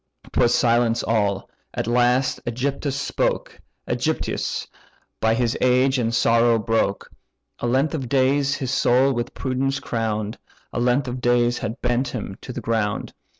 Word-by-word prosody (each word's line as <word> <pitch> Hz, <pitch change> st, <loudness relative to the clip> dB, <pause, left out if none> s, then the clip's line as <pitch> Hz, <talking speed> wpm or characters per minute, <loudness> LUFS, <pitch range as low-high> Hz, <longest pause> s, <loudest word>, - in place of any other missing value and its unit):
'Twas 120 Hz, -, +3 dB
silence 120 Hz, -1 st, +2 dB
all. 100 Hz, -3 st, 0 dB, 0.3 s
At -, -, -1 dB
last 125 Hz, +2 st, +2 dB
AEgyptius 135 Hz, +3 st, -2 dB
spoke; 140 Hz, 0 st, -2 dB, 0.3 s
AEgyptius, -, -, -1 dB, 0.5 s
by 110 Hz, 0 st, +2 dB
his 120 Hz, -1 st, 0 dB
age 130 Hz, +1 st, +3 dB
and 115 Hz, -1 st, 0 dB
sorrow 115 Hz, 0 st, +3 dB
broke; 110 Hz, -2 st, -1 dB, 0.5 s
A -, -, -2 dB
length 135 Hz, +5 st, +1 dB
of 135 Hz, -6 st, -3 dB
days 140 Hz, +1 st, +2 dB
his 130 Hz, -3 st, -3 dB
soul 130 Hz, +1 st, +3 dB
with 120 Hz, 0 st, -4 dB
prudence 135 Hz, +1 st, -1 dB
crown'd, 110 Hz, -1 st, -3 dB, 0.3 s
A -, -, -1 dB
length 125 Hz, +2 st, +2 dB
of 125 Hz, 0 st, -4 dB
days 120 Hz, 0 st, +2 dB
had 115 Hz, +3 st, -4 dB
bent 125 Hz, +1 st, +1 dB
him 105 Hz, -5 st, -5 dB
to -, -, -7 dB
the 125 Hz, -, -5 dB
ground. 110 Hz, -2 st, -1 dB
120 Hz, 150 wpm, -23 LUFS, 115-130 Hz, 0.5 s, Twas